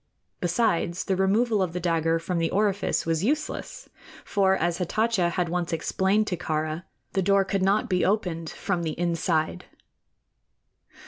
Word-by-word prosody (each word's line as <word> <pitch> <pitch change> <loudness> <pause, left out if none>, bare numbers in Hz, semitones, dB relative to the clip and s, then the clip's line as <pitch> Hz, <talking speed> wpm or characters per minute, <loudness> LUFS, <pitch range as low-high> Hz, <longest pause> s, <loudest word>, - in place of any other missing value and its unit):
Besides, 175 -2 0
the 190 - 0
removal 205 +3 +2
of 180 -3 -1
the 180 - -2
dagger 165 -1 +1
from 170 +1 -2
the 165 -1 +1
orifice 200 0 0
was 165 +1 0
useless; 300 +7 -2 0.4
for, 190 -2 +2
as 175 0 -1
Hatatcha 195 0 +1
had 175 0 -1
once 175 0 -2
explained 190 +5 +1
to 180 -4 -2
Kāra, 155 +1 -2 0.3
the 195 - +1
door 195 +1 +3
could 195 0 -1
not 195 +3 +2
be 185 -3 +1
opened 180 -5 0
from 190 -4 -2
the 160 -1 -3
inside. 165 -2 0
180 Hz, 150 wpm, -26 LUFS, 165-200 Hz, 0.4 s, door